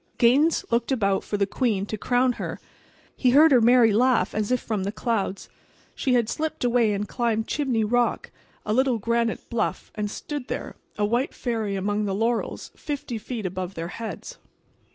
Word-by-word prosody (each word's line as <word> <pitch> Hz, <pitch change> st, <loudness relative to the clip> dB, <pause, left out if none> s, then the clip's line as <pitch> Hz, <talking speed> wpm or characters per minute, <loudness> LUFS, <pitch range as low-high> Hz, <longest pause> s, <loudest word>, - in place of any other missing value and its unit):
Gaines 280 Hz, +8 st, +4 dB
looked 235 Hz, +2 st, +1 dB
about 200 Hz, -7 st, +1 dB
for 205 Hz, -, -3 dB
the 200 Hz, -, +2 dB
queen 205 Hz, -2 st, 0 dB
to 215 Hz, -, -4 dB
crown 245 Hz, +4 st, +2 dB
her. -, -, -4 dB, 0.6 s
He 255 Hz, -, +2 dB
heard 300 Hz, +5 st, +6 dB
her 250 Hz, -3 st, +6 dB
merry 235 Hz, -1 st, +5 dB
laugh, 230 Hz, -4 st, +3 dB
as 215 Hz, +2 st, -1 dB
if 250 Hz, -, +3 dB
from 215 Hz, -5 st, -3 dB
the 200 Hz, -, -2 dB
clouds. 215 Hz, -3 st, -2 dB, 0.5 s
She 255 Hz, -2 st, +1 dB
had 235 Hz, -3 st, +2 dB
slipped 315 Hz, +4 st, -3 dB
away 240 Hz, -3 st, +3 dB
and 205 Hz, +1 st, -2 dB
climbed 225 Hz, -2 st, 0 dB
Chimney 260 Hz, -7 st, 0 dB
Rock, 240 Hz, +3 st, 0 dB, 0.3 s
a 210 Hz, -, 0 dB
little 260 Hz, 0 st, +2 dB
granite 230 Hz, +1 st, -1 dB
bluff, 235 Hz, -, -2 dB
and 210 Hz, -1 st, -3 dB
stood 290 Hz, +4 st, -6 dB
there, -, -, -5 dB, 0.2 s
a 210 Hz, -, +2 dB
white 240 Hz, +6 st, 0 dB
fairy 225 Hz, -5 st, -2 dB
among 205 Hz, +2 st, -1 dB
the 195 Hz, -1 st, -1 dB
laurels, 230 Hz, +3 st, -1 dB
fifty 275 Hz, -6 st, -5 dB
feet 220 Hz, -1 st, -5 dB
above 185 Hz, 0 st, -4 dB
their 165 Hz, +1 st, -4 dB
heads. 230 Hz, -, -7 dB
230 Hz, 180 wpm, -25 LUFS, 210-250 Hz, 0.6 s, heard